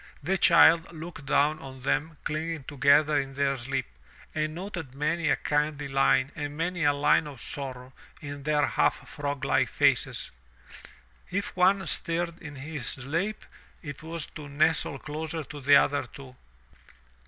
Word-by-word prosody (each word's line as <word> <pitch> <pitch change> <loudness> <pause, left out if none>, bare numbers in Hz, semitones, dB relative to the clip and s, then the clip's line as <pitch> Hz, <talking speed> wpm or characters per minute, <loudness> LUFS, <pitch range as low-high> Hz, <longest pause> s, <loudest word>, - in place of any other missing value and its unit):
The 185 +6 +1
child 170 -1 +6
looked 160 -3 -9
down 150 +2 +3
on 130 -1 -10
them 150 +4 -1
clinging 160 0 -3
together 145 +2 +4
in 135 -1 -4
their 140 0 +1
sleep, 130 0 -3 0.5
and 155 0 -2
noted 175 -7 -6
many 155 +2 0
a - - +4
kindly 150 -1 -1
line 135 0 +3
and 145 -1 -5
many 175 +1 -1
a 145 - +6
line 145 +1 +3
of 140 -4 -9
sorrow 130 0 -7 0.3
in 145 -1 -7
their 150 0 +2
half - - 0
frog 140 -2 -4
like - - +2
faces. - - +1 1.0
If 200 +2 -3
one 190 +2 +4
stirred 170 0 -2
in 150 -3 -8
his 140 -3 -5
sleep 165 - -3 0.4
it 145 -1 -7
was 160 0 -5
to 150 -2 -8
nestle 150 0 +1
closer 155 +3 -5
to 145 +1 -9
the 140 +2 +6
other 140 -2 +3
two. 130 0 -12
150 Hz, 155 wpm, -28 LUFS, 140-160 Hz, 1.0 s, child